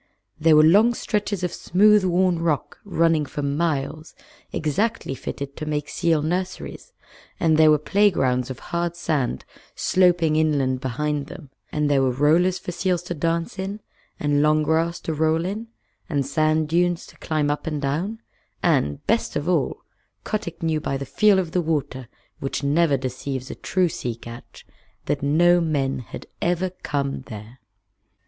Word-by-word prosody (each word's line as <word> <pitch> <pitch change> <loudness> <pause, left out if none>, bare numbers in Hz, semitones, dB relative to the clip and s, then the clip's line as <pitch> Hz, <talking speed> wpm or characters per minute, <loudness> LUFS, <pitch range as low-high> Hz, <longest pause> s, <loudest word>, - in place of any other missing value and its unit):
There 160 0 +5
were 155 - +7
long 210 +9 +5
stretches 205 -4 -2
of 180 - -1
smooth 210 +3 +4
worn 180 -1 +2
rock 165 -4 -1
running 165 -6 +1
for 145 - -5
miles, 150 +1 -2 0.4
exactly 180 +3 -1
fitted 140 +1 -6
to 155 - -5
make 150 -1 -2
seal 165 -4 +1
nurseries, 185 - -4 0.5
and 160 -2 +3
there 155 0 +6
were 150 - +6
play 200 +7 +3
grounds 125 -7 0
of 130 - -5 0.2
hard 170 0 -1
sand 150 -7 -1 0.3
sloping 175 -4 +3
inland 140 -5 +1
behind 145 +3 -2
them, 150 -7 -11 0.2
and 150 -1 0
there 140 -2 +3
were 130 - +3
rollers 160 +8 +3
for 180 - -6
seals 180 0 -1
to 175 - -4
dance 165 +3 -2
in, 195 +2 -4 0.4
and 145 -1 +2
long 155 0 +3
grass 165 +2 +1
to 160 - -3
roll 160 +2 +1
in, 210 +5 -4 0.4
and 140 -4 0
sand 155 +2 +1
dunes 175 +2 +1
to - - -17
climb 150 -3 0
up 145 - -4
and 150 -2 -2
down, 180 +11 -2 0.4
and, 75 0 +1
best 230 +2 0
of 150 - -2
all, 165 -7 0 0.4
Kotick 170 -6 -4
knew 160 -2 0
by 135 - -2
the 140 - -5
feel 210 +6 +4
of 180 -4 -1
the 180 - +1
water, 145 -6 -2 0.3
which 135 +1 -3
never 145 0 +3
deceives 130 0 -4
a - - -4
true 185 -1 0
sea 125 -7 -4
catch, 115 +1 -12 0.4
that 145 - -1
no 175 +5 +4
men 140 -5 0
had 125 - -9 0.2
ever 175 +1 0
come 140 -2 -2
there. 110 +3 -10
155 Hz, 165 wpm, -23 LUFS, 140-175 Hz, 0.5 s, were